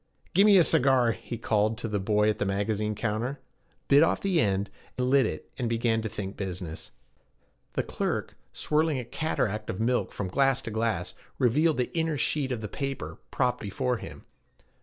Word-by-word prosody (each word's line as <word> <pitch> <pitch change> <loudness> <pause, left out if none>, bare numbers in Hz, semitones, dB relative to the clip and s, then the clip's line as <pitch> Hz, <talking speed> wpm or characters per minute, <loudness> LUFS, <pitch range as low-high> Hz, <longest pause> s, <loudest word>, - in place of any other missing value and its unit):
'Gimme 200 +2 +7
a 175 - +7
cigar,' 130 -6 +4
he 120 +1 -6
called 110 -1 +1
to 120 - -4
the 105 -2 -1
boy 105 +2 +2
at 110 - +1
the - - +1
magazine 105 +2 -1
counter; 115 +6 -2 0.5
bit 140 +1 +6
off 165 - +3
the 190 -4 +1
end, 100 0 0 0.3
lit 130 +1 +3
it, - - -7
and 120 -3 0
began 115 -1 +1
to 110 - -3
think 100 -1 -5
business. 90 -4 -5 0.8
The - - 0
clerk, - - -3 0.2
swirling 155 -1 +1
a 125 - -4
cataract 110 -7 -2
of 90 - -3
milk 120 +2 +1
from 100 - -4
glass 135 +7 +2
to 110 - -5
glass, 110 -5 -1 0.2
revealed 150 +6 +3
the 125 +5 -2
inner 160 -2 +1
sheet 140 -1 0
of 120 -3 -2
the 105 - -4
paper 135 +4 -5
propped 125 -1 0
before 120 +5 -1
him. 80 -8 -10
115 Hz, 180 wpm, -28 LUFS, 105-135 Hz, 0.8 s, Gimme